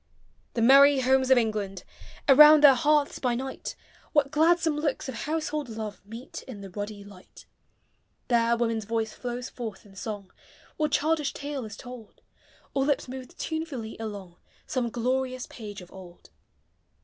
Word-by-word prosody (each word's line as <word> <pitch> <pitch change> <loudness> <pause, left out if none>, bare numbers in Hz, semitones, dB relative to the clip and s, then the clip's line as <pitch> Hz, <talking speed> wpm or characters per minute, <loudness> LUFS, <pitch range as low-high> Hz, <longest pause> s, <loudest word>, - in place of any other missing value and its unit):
The 230 - +1
merry 275 +2 +7
Homes 260 0 +3
of 260 - +6
England! 210 -5 -1 0.4
Around 300 +2 +8
their 280 -2 +10
hearths 295 +3 +2
by 245 -2 0
night, 265 +2 -5 0.4
What 285 -2 +3
gladsome 325 0 +3
looks 300 -3 -2
of 265 - -4
household 305 +1 -3
love 220 -2 -6
Meet 230 +4 -8
in 225 -6 -8
the 195 -1 -9
ruddy 205 +1 -6
light. 200 -2 -15 0.8
There 235 -1 +3
woman's 230 -2 -1
voice 225 0 -2
tiows 245 0 -5
forth 220 -6 -7
in 195 -1 -17
song, 200 -1 -6 0.5
Or 305 -1 +2
childish 300 0 +1
tale 285 -3 -5
is 210 -1 -9
told; 245 -4 -12 0.5
Or 270 - +1
lips 285 -1 0
move 255 0 -7
tunefully 310 -9 -4
along 200 -5 -7 0.3
Some 245 -3 -1
glorious 255 +2 -2
page 205 -4 -9
of 180 - -14
old. 180 -2 -13
250 Hz, 150 wpm, -27 LUFS, 215-280 Hz, 0.8 s, their